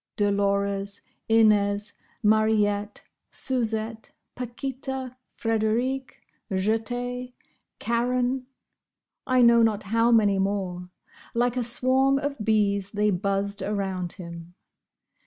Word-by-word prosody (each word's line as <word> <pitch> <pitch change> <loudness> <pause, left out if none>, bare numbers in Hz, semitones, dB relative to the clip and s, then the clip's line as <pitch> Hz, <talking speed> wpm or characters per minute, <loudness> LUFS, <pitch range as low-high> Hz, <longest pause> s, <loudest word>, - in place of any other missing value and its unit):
Dolores, 200 -1 0 0.3
Inez, 210 -2 +3 0.3
Mariette, 210 -1 +2 0.2
Suzette, 225 -3 -3 0.2
Paquita, 260 +1 -5 0.2
Frederike, 230 +4 0 0.4
Jette, 245 +5 -2 0.4
Karen—I 250 +1 -2
know 235 0 +6
not 220 -2 +2
how 230 +4 +2
many 205 -4 +4
more—like 195 +5 -3
a 250 - 0
swarm 260 +3 +2
of 280 -4 -3
bees 200 -2 +1
they 210 0 +2
buzzed 200 +1 -1
around 190 -4 -2
him. 170 -1 -10
220 Hz, 85 wpm, -26 LUFS, 200-245 Hz, 0.4 s, know